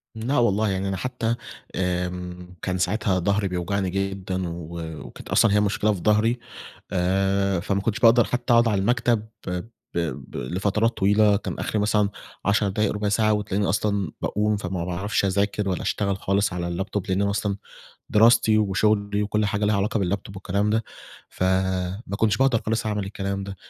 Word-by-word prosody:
لأ 120 +6 -1
والله 110 -3 +3
يعني، 95 0 -1
أنا 95 -1 -2
حتى 120 +1 -1 0.4
آمم 90 0 -3
كان 90 -1 -1
ساعتها 95 +1 +1
ضهري 100 +2 +1
بيوجعني 90 +1 -1
جدًا، 95 -1 -2
و 85 0 -7 0.3
و - - -10
كانت - - -12
أصلًا 110 -3 +4
هي 105 - +5
مشكلة 105 +1 +1
في 95 - -5
ضهري، 110 +4 +2 0.5
آآ 95 +1 +1
فما 100 +2 -1
كنتش 115 +2 -1
باقدر 115 +1 +6
حتى 125 0 -1
أقعد 115 0 +5
على 100 -3 +1
المكتب 115 0 +1 0.2
ب 90 +1 -3 0.3
ب 85 -2 -3
لفترات 100 - 0
طويلة، 105 +1 +4
كان 100 - -5
آخري 110 - -1
مثلًا 105 -1 +2 0.4
10 100 0 +2
دقايق 105 +1 0
ربع 105 0 -1
ساعة، 110 +1 +3
وتلاقيني 105 -1 0
أصلًا 100 -3 0
باقوم، 105 +1 +1
فما 90 -3 -3
باعرفش 95 +5 -1
أذاكر 100 +1 0
ولا 90 - -1
أشتغل 100 -2 0
خالص 100 0 +1
على 85 -1 -3
اللابتوب، 95 +2 -3
لأن 95 +1 +1
أنا 100 - +1
أصلًا 100 -1 -1 0.5
دراستي 110 0 +5
وشغلي 105 0 +1
وكل 105 0 0
حاجة 105 +1 -1
ليها 105 0 +2
علاقة 105 +3 0
باللابتوب 100 +1 -2
والكلام 100 +2 0
ده، 110 +1 +1 0.4
فما 95 +2 -1
كنتش 110 -1 +2
باقدر 130 -4 +3
خالص 110 0 0
أعمل 105 -2 -1
الكلام 100 0 -3
ده. 100 -1 -7
100 Hz, 170 wpm, -24 LUFS, 95-105 Hz, 0.5 s, باقدر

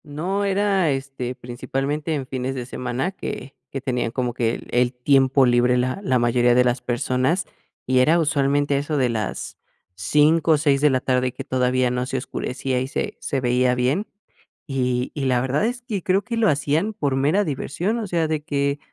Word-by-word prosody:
No 180 +8 -2
era, 195 -3 +2
este, 135 -2 -3
principalmente 135 +6 -3
en 140 -3 -3
fines 130 0 -3
de 125 -2 -4
semana 125 +6 -3
que 135 -7 -7
que 135 - -4
tenían 125 -3 -2
como 125 -1 -2
que 115 -1 0
el - - -10
el 125 +1 +2
tiempo 135 +1 +3
libre 125 0 +3
la 130 +9 -1
la 130 -9 +2
mayoría 120 0 +3
de 125 - +5
las 125 0 +1
personas, 130 +8 0 0.4
y 130 0 +2
era 155 +7 +4
usualmente 145 -2 +1
a - - +2
eso 145 +1 -2
de 130 -2 +3
las 110 -4 -4 0.4
5, 150 - +3
o - - +4
6 145 -2 +2
de 150 - +5
la 130 -2 +2
tarde, 130 -1 +1
que - - -7
todavía 125 -1 +1
no 125 0 -1
se 130 - -3
oscurecía 130 0 -3
y 130 - -2
se - - -3
se 135 - -1
veía 125 0 +2
bien. 130 - 0 0.6
Y 125 -2 -1
y 140 -3 -3
la 125 -2 +2
verdad 130 +9 0
es 245 +1 -3
que 215 -6 -3
creo 195 +2 +2
que 240 -1 -4
lo 225 -3 +3
hacían 150 +8 0
por 145 -10 -1
mera 150 +10 +2
diversión, 175 - -2
o 220 - -4
sea, 170 -3 0
de 155 -1 -2
que 140 -1 -1
135 Hz, 200 wpm, -22 LUFS, 125-155 Hz, 0.6 s, de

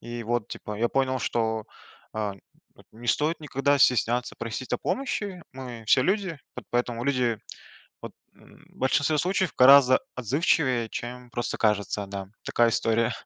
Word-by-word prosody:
И 120 0 -6
вот 115 -1 -1
типа 105 - -7
я 120 +3 +1
понял, 130 0 0
что, 110 -2 -1 0.5
э, 105 -2 -2 0.6
не 120 +2 -11
стоит 155 +6 +1
никогда 140 -1 +1
стесняться 125 -1 +2
просить 115 +2 -5
о - - +1
помощи, 205 -9 -3
мы 125 -4 -8
все 130 - +5
люди, 190 -2 0 0.2
по - - -7
поэтому 120 -1 -1
люди 125 -5 +1 0.6
вот, - - -7 0.2
м, - - -20
в - - -25
большинстве 145 +3 +2
случаев 185 0 0
гораздо 130 0 +8 0.2
отзывчивее, 130 - +1
чем 125 0 -7
просто 120 -1 -3
кажется, 105 -1 0
да. 95 -1 -6 0.2
Такая 120 -1 +3
история. 115 +1 +1
125 Hz, 150 wpm, -26 LUFS, 115-140 Hz, 0.6 s, гораздо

